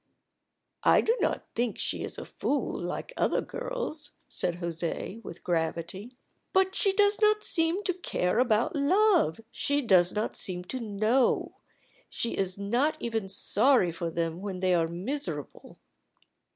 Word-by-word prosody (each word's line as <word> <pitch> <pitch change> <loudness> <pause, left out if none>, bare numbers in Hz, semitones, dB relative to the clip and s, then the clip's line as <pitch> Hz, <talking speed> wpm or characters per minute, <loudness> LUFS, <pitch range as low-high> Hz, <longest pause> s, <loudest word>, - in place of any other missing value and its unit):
"I - - +6
do 460 - +2
not - - 0
think 240 0 -1
she - - -1
is - - -4
a - - -6
fool - - -2
like - - -4
other - - +2
girls," - - -5
said 175 - -1
José, 170 +5 -4
with 170 - -9
gravity. 170 +6 -2 0.4
"But 380 0 +3
she 395 - +2
does 410 +1 +3
not 425 0 +4
seem 335 +4 +1
to 370 - +1
care 230 - -1
about 240 0 +2
love; 330 - +3
she 285 +3 0
does 185 -5 +5
not 215 +1 -2
seem 180 -1 -4
to 255 +8 -4
know. 220 +3 +1 0.6
She 235 - -2
is 185 -1 -1
not 240 +10 +1
even 225 -4 -2
sorry 215 0 +3
for 165 +1 -3
them 165 +1 -2
when 195 -2 -4
they 185 0 +2
are 165 -2 +3
miserable." 175 - -5
220 Hz, 150 wpm, -28 LUFS, -, 0.6 s, I